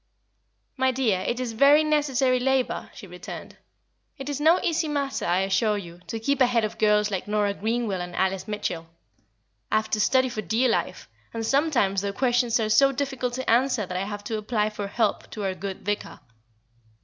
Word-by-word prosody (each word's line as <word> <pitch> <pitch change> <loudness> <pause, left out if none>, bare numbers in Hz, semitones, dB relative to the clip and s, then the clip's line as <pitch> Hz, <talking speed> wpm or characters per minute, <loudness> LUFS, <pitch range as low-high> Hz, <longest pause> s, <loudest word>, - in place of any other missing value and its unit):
"My 260 0 +3
dear, 245 -7 +1
it 240 +6 -2
is 250 -2 -2
very 280 +6 +6
necessary 270 -4 +2
labour," 265 0 0
she - - -11
returned. 180 -1 -9 0.6
"It 270 0 -6
is 290 0 -3
no 325 +4 +5
easy 330 -1 0
matter, 280 -2 -2
I 175 +2 +2
assure 195 +2 +1
you, 175 -3 -9
to 225 - -4
keep 280 +5 0
ahead 245 -3 +3
of 220 +1 -7
girls 210 -1 +3
like 190 0 -3
Nora 205 -1 +1
Greenwell 220 -2 -2
and 175 0 -6
Alice 190 0 -1
Mitchell. 175 -6 -3 0.8
I - - +2
have 220 0 0
to 215 - +1
study 260 +4 +3
for 220 -3 -4
dear 225 +7 +1
life, 225 -4 -2 0.3
and 225 0 -2
sometimes 255 -8 +2
their 200 0 -3
questions 245 -1 +1
are 220 - 0
so 275 +5 +5
difficult 265 -3 -3
to 260 0 -5
answer 245 -2 +2
that 180 - -7
I 185 +2 -1
have 205 0 -6
to 220 0 -3
apply 215 0 -1
for 205 -1 -5
help 215 +1 -1
to 210 - -6
our 190 -1 -1
good 190 0 -7
Vicar. 205 0 -3
225 Hz, 195 wpm, -25 LUFS, 200-260 Hz, 0.8 s, very